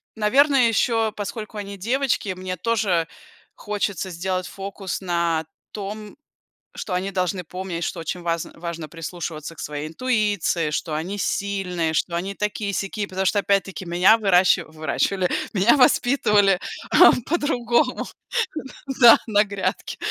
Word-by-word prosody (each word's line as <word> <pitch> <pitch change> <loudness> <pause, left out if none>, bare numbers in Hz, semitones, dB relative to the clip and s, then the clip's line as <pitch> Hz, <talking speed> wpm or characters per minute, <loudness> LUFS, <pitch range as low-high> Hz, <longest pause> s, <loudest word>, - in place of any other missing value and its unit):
наверное, 260 +3 +4
еще 225 -1 +1
поскольку 215 +1 -6
они 200 -1 -6
девочки, 235 -1 0
мне 185 0 -5
тоже 190 -5 +1 0.5
хочется 200 -3 -3
сделать 185 +1 -2
фокус 195 -1 -6
на 170 -3 0 0.3
том, 210 +1 -7 0.6
что 185 - -4
они 190 +2 -1
должны 185 0 -1
помнить, 180 0 -5
что 175 - -3
очень 175 +2 -4
вазн 170 -1 -2
важно 170 -2 -6
прислушиваться 165 -1 -6
к - - -30
своей 150 +1 -5
интуиции, 205 -5 0
что 150 +1 -2
они 175 +7 -3
сильные, 185 -5 -1
что 170 +2 0
они 190 +4 -3
такие-сякие, 205 0 -2
потому 190 +1 -2
что 205 +2 +3
опять-таки 195 -1 0
меня 180 +6 +5
выращи 190 -3 +4
выращивали, 165 +4 -1 0.2
меня 210 +6 +4
воспитывали 210 -7 +4 0.7
по-другому, 255 -5 +1 1.0
да 235 -2 +10
на 210 -2 +4
грядке. 200 -2 -3
195 Hz, 125 wpm, -23 LUFS, 175-210 Hz, 1.0 s, да